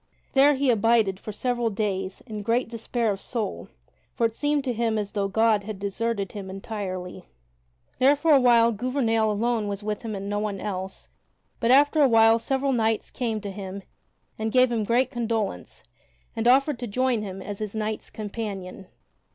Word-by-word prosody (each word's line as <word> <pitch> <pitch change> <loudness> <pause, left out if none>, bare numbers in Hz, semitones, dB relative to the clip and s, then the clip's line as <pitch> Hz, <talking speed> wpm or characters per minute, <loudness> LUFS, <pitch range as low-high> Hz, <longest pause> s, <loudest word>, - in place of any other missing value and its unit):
There 280 +2 +5
he 270 -1 +2
abided 225 -3 +2
for 215 - -7
several 240 +2 -1
days 195 -2 -3
in 215 -4 -6
great 230 +4 +1
despair 230 0 -2
of 195 - -5
soul, 225 -5 -4 0.5
for 235 - +1
it 225 - 0
seemed 290 +3 0
to 255 -2 -1
him 230 -1 0
as 205 -1 -3
though 200 -2 -1
God 220 0 +2
had 215 -2 -5
deserted 200 +1 -2
him 200 -3 -7
entirely. 190 -2 -6 0.7
There 275 +3 +5
for 310 +3 +1
a 285 - +7
while 235 -2 +5
Gouvernail 225 -1 0
alone 220 0 0
was 200 0 -4
with 210 -1 -3
him 220 -3 -5
and 195 0 -5
no 205 0 -1
one 210 -2 -3
else, 190 -1 -5 0.5
but 230 - 0
after 290 +4 +5
a 275 - +6
while 225 0 +5
several 270 +3 0
knights 225 -2 0
came 230 -4 -2
to 200 -1 -5
him 195 0 -7 0.6
and 220 0 -1
gave 255 0 +4
him 225 -3 0
great 240 +4 +2
condolence 225 - -3 0.5
and 225 +1 0
offered 270 +1 +4
to 245 - -4
join 255 +3 +1
with 210 - -4
him 190 0 -8
as 205 -1 -6
his 215 -1 -5
knights 215 0 -3
companion. 200 -3 -6
225 Hz, 185 wpm, -25 LUFS, 205-240 Hz, 0.7 s, a